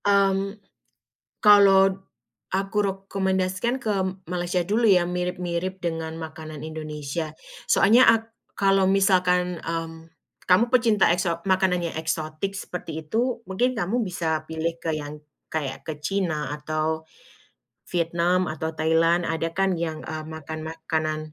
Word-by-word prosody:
Mmm, 195 0 +2 0.9
kalau 195 -2 +6 0.6
aku 195 +1 -2
rekomendasikan 195 +4 -1
ke 220 - -1 0.4
Malaysia 180 0 0
dulu, 215 +6 +1
ya, 185 -4 +6
mirip-mirip 180 +1 -3
dengan 165 -2 -3
makanan 155 -2 -8
Indonesia. 155 0 -5 0.3
Soalnya 230 +6 +6
ak 225 0 +4 0.2
kalau 195 -1 +3
misalkan, 180 -2 +3
mmm, 165 0 -5 0.4
kamu 215 +6 +4
pecinta 225 -7 +4
ekso 170 -1 0
makanan 185 -1 +2
yang - - -10
eksotik 160 +4 -3
seperti 170 -5 -6
itu, 235 +8 -1
mungkin 245 +7 +1
kamu 225 +3 -1
bisa 160 -3 -2
pilih 165 +1 -3
ke 165 -1 -2
yang 150 0 -6 0.3
kayak 140 -4 -3
ke 155 -2 -6
Cina 155 -3 -2
atau 155 +1 -2 0.9
Vietnam 175 +1 +1
atau 160 +1 -4
Thailand, 165 +2 +3
ada 165 0 -2
kan 190 -1 +1
yang, 160 -2 -3
eee, 155 0 -5
makan 155 0 -7
makanan, 160 -1 -2
175 Hz, 125 wpm, -25 LUFS, 160-195 Hz, 0.9 s, kalau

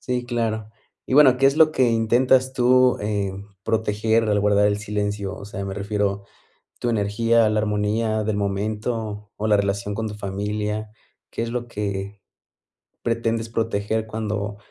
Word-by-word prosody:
Sí, 125 -1 -2
claro. 110 -3 -2 0.4
Y 130 - -1
bueno, 135 -4 +7
¿qué 135 +1 +4
es 140 +2 +3
lo 160 -1 +6
que 130 -4 +3
intentas 125 +3 +3
tú, 125 0 +4
eh, 100 -2 -1 0.3
proteger 110 +1 +1
al 105 -1 +2
guardar 105 0 +3
el 105 0 +1
silencio? 105 -1 -3
O - - -9
sea, 100 -1 -6
me 95 - -4
refiero, 100 -1 -1 0.6
¿tu 120 - -1
energía, 115 +2 +2
la 110 0 +1
armonía 110 +1 0
del 105 -1 -1
momento, 105 +1 -3
o 110 - -2
la 105 -1 +4
relación 100 0 -1
con 115 0 -2
tu 105 - -6
familia? 105 +2 -3 0.4
¿Qué 115 - -3
es 115 - -3
lo 120 0 -3
que 100 -2 -4 0.8
pretendes 115 -1 -1
proteger 110 -1 -1
cuando 105 -2 -3
110 Hz, 160 wpm, -23 LUFS, 105-115 Hz, 0.8 s, bueno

